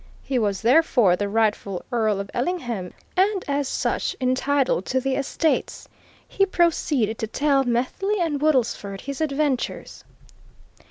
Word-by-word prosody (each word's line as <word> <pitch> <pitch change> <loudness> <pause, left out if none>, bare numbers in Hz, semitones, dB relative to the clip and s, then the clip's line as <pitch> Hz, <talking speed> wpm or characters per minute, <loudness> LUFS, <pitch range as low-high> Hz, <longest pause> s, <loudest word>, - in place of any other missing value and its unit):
He 260 -2 -1
was, 205 -2 -1
therefore, 245 - +4
the 200 +2 -2
rightful 210 -3 0
Earl 220 -4 +1
of 200 0 -6
Ellingham, 240 - -2 0.2
and 385 +1 +2
as 285 -1 0
such - - -1
entitled 260 -3 +1
to 260 - +1
the 270 +1 -1
estates. 285 +3 -1 0.4
He 390 - +1
proceeded 310 - +1
to 220 - -2
tell 275 +3 +2
Methley 260 - -1
and 310 -5 -1
Woodlesford 235 -9 0
his 280 +1 -6
adventures. 285 -3 -2
260 Hz, 130 wpm, -23 LUFS, 220-300 Hz, 0.4 s, therefore